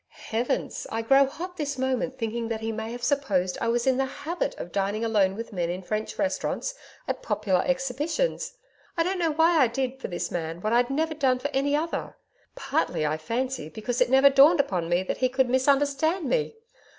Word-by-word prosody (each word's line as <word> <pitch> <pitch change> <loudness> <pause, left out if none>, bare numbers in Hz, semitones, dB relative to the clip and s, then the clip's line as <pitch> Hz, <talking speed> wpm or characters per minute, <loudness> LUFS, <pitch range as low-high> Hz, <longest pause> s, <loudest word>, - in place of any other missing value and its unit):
Heavens! 230 +2 -1
I 225 0 -2
grow 270 +3 +5
hot 360 +6 -7
this 285 -3 -3
moment 260 0 -1
thinking 230 -1 -2
that 225 -1 -3
he 225 0 -2
may 220 +1 -4
have 240 0 -7
supposed 200 -12 +1
I - - 0
was 235 +1 +1
in 260 -1 +3
the 270 - +2
HABIT 335 +6 -3
of 175 - -7
dining 200 +4 -1
alone 200 -4 +2
with 230 +1 -7
men 175 -3 -1
in 180 +2 -4
French 215 +3 -3
restaurants 295 +11 -1 0.3
at - - -2
popular 205 - +1
Exhibitions. 295 - -1 0.4
I 330 - +3
don't 370 +2 -1
know 335 -2 +2
why 325 +2 +4
I 265 - +6
did 260 +2 -3
for - - -3
this 175 - -4
man 165 -1 -3
what 215 +3 0
I'd 245 +1 +3
never 315 +3 0
done 270 -4 +2
for 270 +3 -3
any 280 +2 +1
other, 320 +3 -3 0.4
Partly, 330 - -1
I 150 +1 0
fancy, 230 - -3
because 235 - -3
it 250 - +4
never 270 +2 +6
dawned 285 +5 +6
upon 180 -11 0
me 175 +1 +2
that - - -3
he 255 - +2
could 260 0 +2
misunderstand 285 +5 +2
me. 460 -2 0
260 Hz, 205 wpm, -26 LUFS, 220-285 Hz, 0.4 s, I